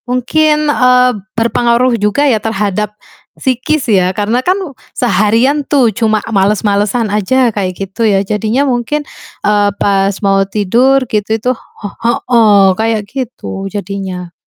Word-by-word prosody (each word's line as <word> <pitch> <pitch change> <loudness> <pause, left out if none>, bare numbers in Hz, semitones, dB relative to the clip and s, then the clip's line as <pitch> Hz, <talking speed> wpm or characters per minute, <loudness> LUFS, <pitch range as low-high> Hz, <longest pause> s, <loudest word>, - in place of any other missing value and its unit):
Mungkin, 300 +5 +1
eee, 250 -3 +3 0.3
berpengaruh 235 +2 +2
juga 210 +8 +1
ya 235 -7 +2
terhadap 210 -1 -2 0.4
psikis 260 +3 -1
ya, 185 -4 +2
karena 220 +5 -1
kan 370 +5 +1 0.3
seharian 230 +6 +1
tuh 270 -3 +2
cuma 220 -1 +1 0.2
males-malesan 205 +3 +1
aja 210 +5 +1
kayak 190 -3 -1
gitu 195 +4 -4
ya, 205 -3 +3
jadinya 220 +7 0
mungkin, 265 +4 -2 0.4
eee, 205 -1 +3
pas 195 -1 +2
mau 195 0 +3
tidur 235 +7 +1
gitu 210 -2 -2
itu 245 - -1
he 210 - -11 0.3
heeh, 215 -5 +4
kayak 220 +1 0
gitu 215 -6 -6
jadinya. 190 -3 -5
220 Hz, 130 wpm, -13 LUFS, 200-250 Hz, 0.4 s, heeh